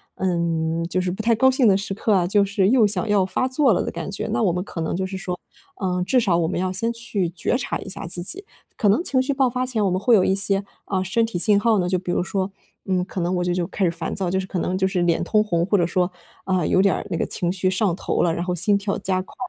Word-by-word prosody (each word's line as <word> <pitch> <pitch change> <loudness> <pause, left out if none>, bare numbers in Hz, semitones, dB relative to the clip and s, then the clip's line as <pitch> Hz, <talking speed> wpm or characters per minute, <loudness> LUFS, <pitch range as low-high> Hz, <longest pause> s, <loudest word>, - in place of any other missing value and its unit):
嗯， 170 -2 -1
就 185 +1 0
是 180 - -1
不 190 - -4
太 230 - +3
高 260 +4 +4
兴 255 -3 +3
的 195 - +5
时 195 0 -4
刻 215 +2 0
啊， 185 -3 +3
就 200 +2 +3
是 195 -1 +1
又 240 -2 +5
想 200 0 -1
要 200 -2 +3
发 185 +7 -1
作 260 0 +2
了 - - +1
的 - - -4
感 - - -5
觉。 195 - -4
那 230 - 0
我 185 - +3
们 180 +1 -2
可 180 - -8
能 160 - -2
就 190 +1 -1
是 190 0 -5
说， 180 -1 -4 0.4
呃， 180 -1 0
至 255 - +3
少 190 -8 +2
我 165 - +1
们 180 - -2
要 185 0 -1
先 225 +5 0
去 215 -5 -2
觉 180 +8 -1
察 250 - -3
一 - - -8
下 200 0 -4
自 175 +1 0
己， 390 - -1 0.3
可 215 - +1
能 215 - +3
情 260 -7 +2
绪 265 +2 -1
爆 265 -2 +2
发 255 +1 -2
前 235 -4 0
我 195 - +2
们 185 +1 0
会 235 +3 +4
有 190 - +4
一 190 - +2
些， 195 0 +1 0.2
啊， 190 -1 -1
身 225 +5 +1
体 225 -6 -4
信 205 +3 +4
号 220 -1 +2
呢。 180 - 0
就 185 - +1
比 180 0 -4
如 - - 0
说， 190 0 -2 0.3
嗯， 185 -2 0
可 190 - -6
能 175 +2 0
我 180 - 0
就 180 - 0
就 175 - 0
开 200 - -3
始 180 - +4
烦 165 -1 -5
躁， 190 -3 -1
就 190 - 0
是 190 - -4
可 185 - -3
能 180 +2 -1
就 190 0 +2
是 185 -2 -1
脸 175 0 +1
通 215 +4 +2
红， 170 -5 0
或 200 - +1
者 175 - +2
说， 180 0 0 0.3
啊， 185 -2 +1
有 185 - +2
点 195 -1 +3
儿 - - -5
那 170 - -2
个 - - 0
情 175 -1 -1
绪 185 0 -1
上 190 -1 +1
头 - - -1
了， 170 - +2
然 170 +1 -2
后 180 - -1
心 200 +4 +3
跳 200 0 -2
加 185 -1 -1
快， 185 - -14
190 Hz, 325 characters per minute, -22 LUFS, 180-210 Hz, 0.4 s, 的